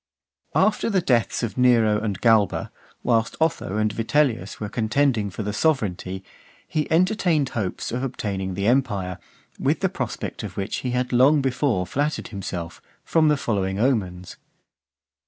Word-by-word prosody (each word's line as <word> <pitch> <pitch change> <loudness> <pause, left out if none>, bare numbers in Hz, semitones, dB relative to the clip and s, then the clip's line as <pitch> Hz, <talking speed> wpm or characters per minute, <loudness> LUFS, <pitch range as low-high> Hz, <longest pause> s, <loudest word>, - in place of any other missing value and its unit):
V. - - +2
After 215 +1 +2
the 200 -3 +2
deaths 120 -7 +1
of 115 +2 -3
Nero 115 -4 +4
and 100 -4 -2
Galba, 110 -4 +3 0.3
whilst 115 -2 +1
Otho 160 -10 0
and 110 -1 +1
Vitellius 115 -3 0
were 105 - -3
contending 115 0 +1
for 105 +3 -5
the 105 0 -3
sovereignty, 100 - -1 0.4
he 155 -1 -2
entertained 170 - +2
hopes 105 -8 -3
of 125 - -2
obtaining 100 -7 -3
the 100 +1 -2
empire, 105 -7 +1 0.4
with - - +1
the - - +2
prospect - - -4
of - - -7
which 100 +1 -2
he 130 - -3
had 125 +1 -1
long 135 +5 +5
before 130 -7 0
flattered 145 - -2
himself, 90 -5 -6 0.2
from 160 -1 +3
the 150 -1 +3
following 95 -6 -1
omens. 95 -8 -1
115 Hz, 155 wpm, -23 LUFS, 100-140 Hz, 0.4 s, long